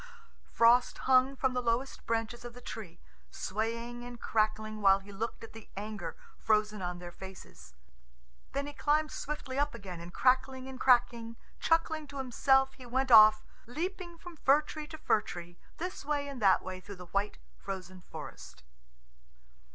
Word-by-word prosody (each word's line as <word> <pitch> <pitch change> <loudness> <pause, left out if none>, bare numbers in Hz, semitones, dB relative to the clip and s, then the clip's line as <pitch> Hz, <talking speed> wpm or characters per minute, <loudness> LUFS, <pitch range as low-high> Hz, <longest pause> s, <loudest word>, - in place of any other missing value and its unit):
Frost 235 +2 +5
hung 260 +1 +5
from 265 -1 +1
the 250 - 0
lowest 240 +3 -1
branches 230 +1 -1
of 240 0 -8
the - - -9
tree, 220 -8 -8 0.3
swaying 230 - -3
and 245 -1 -8
crackling 215 0 0
while 195 -1 +6
he 195 +1 -12
looked 225 +4 -4
at 225 - -10
the 225 -1 -12
anger 200 -5 -5 0.2
frozen 215 -1 +1
on 180 -1 -3
their 175 0 -8
faces. 180 - -12 0.8
Then 280 +1 -1
he 290 - -7
climbed 305 +1 +1
swiftly 280 -2 -4
up 290 -3 0
again, 190 -6 -7
and 170 +1 -9
crackling 260 +3 +2
and 265 -1 -8
cracking, 235 -2 +3 0.2
chuckling 320 -2 +1
to 280 0 -9
himself, 270 +1 +3
he 255 - -13
went 260 +2 0
off, 215 -1 +9 0.2
leaping 345 +5 -4
from 345 -1 -11
fir 285 +1 +4
tree 300 0 -7
to 315 0 -8
fir 220 -7 +2
tree, 175 -4 -9 0.2
this 360 +3 -5
way 290 0 -1
and 275 -4 -7
that 195 -2 +5 0.2
through 200 0 -8
the 180 -1 -10
white, 200 +4 -1 0.2
frozen 185 - -7
forest. - - -9
235 Hz, 165 wpm, -31 LUFS, 205-270 Hz, 0.8 s, off